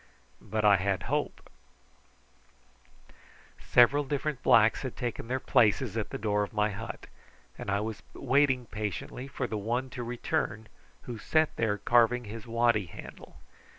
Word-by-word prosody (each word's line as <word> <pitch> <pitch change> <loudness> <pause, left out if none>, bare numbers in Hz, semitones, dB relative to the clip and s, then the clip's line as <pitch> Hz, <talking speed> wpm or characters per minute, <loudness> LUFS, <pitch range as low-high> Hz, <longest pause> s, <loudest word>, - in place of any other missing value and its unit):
But 105 +1 -2
I 100 -1 +7
had 95 0 -1
hope. - - -3 2.1
Several 140 +4 +4
different 145 -1 -3
blacks 110 -2 +5
had 130 - -6
taken 120 -2 -4
their 130 +2 -1
places 120 -2 +2
at 110 -2 -2
the - - -5
door 105 -1 0
of 105 - -3
my 105 0 +1
hut, 100 - -7 0.5
and - - -7
I 100 +1 +1
was 110 -1 -5
waiting 135 -2 +2
patiently 105 +4 -5
for 140 -1 -3
the 110 -3 -3
one 120 +5 -2
to 125 - -6
return 115 -2 -2 0.4
who 120 -3 -7
sat 155 +5 +1
there 110 -2 0
carving 120 +2 +3
his 110 +1 -9
waddy 115 -4 +2
handle. - - -11
115 Hz, 150 wpm, -29 LUFS, 105-125 Hz, 2.1 s, I